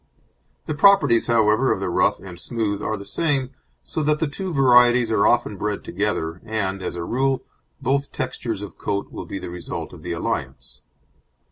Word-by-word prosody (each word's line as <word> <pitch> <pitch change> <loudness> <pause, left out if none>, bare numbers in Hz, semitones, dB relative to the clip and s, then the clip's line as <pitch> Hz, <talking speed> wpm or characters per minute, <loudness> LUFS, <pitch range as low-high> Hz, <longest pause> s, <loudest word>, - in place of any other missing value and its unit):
The 155 - -2
properties, 145 -8 +5
however, 115 +2 +3
of - - 0
the 95 - -2
rough 90 +2 +2
and 90 -3 -10
smooth 105 -2 -2
are 110 - -2
the 100 - -9
same, 140 -4 0 0.3
so 160 - -3
that 150 0 +2
the - - +1
two 185 +6 -5
varieties 125 -4 +5
are 100 -2 +4
often 105 - +2
bred 105 +1 -2
together, 90 -3 -2
and, 100 -4 -2
as 90 - -4
a 85 - -4
rule, 135 +6 0 0.4
both 140 +2 0
textures 115 -5 -4
of 100 - -10
coat 100 0 -2
will - - -7
be - - -5
the 90 -2 -7
result 90 -1 -6
of - - -11
the - - -4
alliance. - - -4
110 Hz, 180 wpm, -23 LUFS, 95-135 Hz, 0.4 s, properties